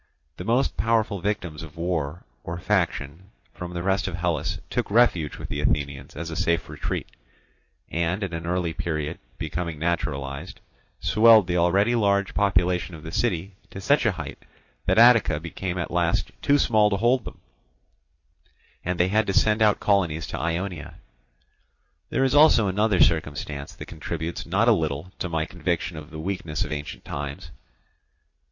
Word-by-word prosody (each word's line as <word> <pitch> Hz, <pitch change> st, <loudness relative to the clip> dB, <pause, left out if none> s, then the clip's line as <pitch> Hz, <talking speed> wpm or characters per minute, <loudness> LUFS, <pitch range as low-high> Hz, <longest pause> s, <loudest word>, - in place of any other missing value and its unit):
The -, -, -6 dB
most 115 Hz, -, +1 dB
powerful 110 Hz, +1 st, +1 dB
victims 85 Hz, -6 st, -3 dB
of 80 Hz, 0 st, -10 dB
war 85 Hz, -2 st, -2 dB, 0.2 s
or 85 Hz, +1 st, -5 dB
faction 90 Hz, -3 st, -1 dB, 0.2 s
from 90 Hz, -1 st, -7 dB
the 85 Hz, -, -3 dB
rest 95 Hz, +1 st, +1 dB
of 95 Hz, -, -3 dB
Hellas 85 Hz, -3 st, -1 dB
took -, -, -1 dB
refuge 100 Hz, -9 st, +3 dB
with -, -, -6 dB
the -, -, -3 dB
Athenians 70 Hz, -2 st, -1 dB
as 80 Hz, +1 st, -5 dB
a -, -, -4 dB
safe 85 Hz, +1 st, 0 dB
retreat; -, -, -4 dB, 0.8 s
and 85 Hz, +4 st, -1 dB
at 95 Hz, -3 st, -4 dB
an 85 Hz, 0 st, -4 dB
early 90 Hz, -2 st, -1 dB
period, 75 Hz, -3 st, -3 dB, 0.2 s
becoming 85 Hz, -3 st, -4 dB
naturalized, 70 Hz, -4 st, -3 dB, 0.4 s
swelled 110 Hz, -2 st, +6 dB
the 90 Hz, 0 st, 0 dB
already 95 Hz, +7 st, +3 dB
large 100 Hz, -3 st, +2 dB
population 90 Hz, -3 st, +1 dB
of 75 Hz, -, -12 dB
the 80 Hz, -, -7 dB
city 95 Hz, -2 st, -1 dB, 0.2 s
to -, -, -8 dB
such 140 Hz, +10 st, +3 dB
a 110 Hz, -, +2 dB
height 80 Hz, -6 st, -7 dB, 0.5 s
that -, -, +3 dB
Attica 115 Hz, -9 st, +6 dB
became 90 Hz, +3 st, -4 dB
at 85 Hz, -, -3 dB
last 85 Hz, -1 st, +1 dB
too 145 Hz, -, +4 dB
small 110 Hz, -6 st, +4 dB
to 100 Hz, -, 0 dB
hold 120 Hz, +3 st, +2 dB
them, -, -, -9 dB, 1.4 s
and 90 Hz, 0 st, -2 dB
they 90 Hz, +1 st, +3 dB
had 110 Hz, +2 st, +2 dB
to 95 Hz, -, 0 dB
send 110 Hz, +3 st, +3 dB
out 105 Hz, -2 st, +4 dB
colonies 85 Hz, -6 st, +1 dB
to -, -, -5 dB
Ionia. 85 Hz, -1 st, -3 dB, 1.1 s
There 135 Hz, -, +1 dB
is 135 Hz, -1 st, +2 dB
also 145 Hz, -8 st, +6 dB
another 100 Hz, 0 st, +2 dB
circumstance 75 Hz, -3 st, 0 dB
that -, -, -8 dB
contributes 80 Hz, +1 st, -5 dB
not 100 Hz, +7 st, +2 dB
a -, -, +7 dB
little 80 Hz, -3 st, -1 dB
to 90 Hz, -, -2 dB
my 80 Hz, -1 st, 0 dB
conviction 85 Hz, -2 st, -2 dB
of 75 Hz, 0 st, -9 dB
the 80 Hz, -, -9 dB
weakness 80 Hz, -2 st, -3 dB
of -, -, -7 dB
ancient 75 Hz, -1 st, -6 dB
times. 70 Hz, 0 st, -6 dB
90 Hz, 165 wpm, -25 LUFS, 80-100 Hz, 1.4 s, a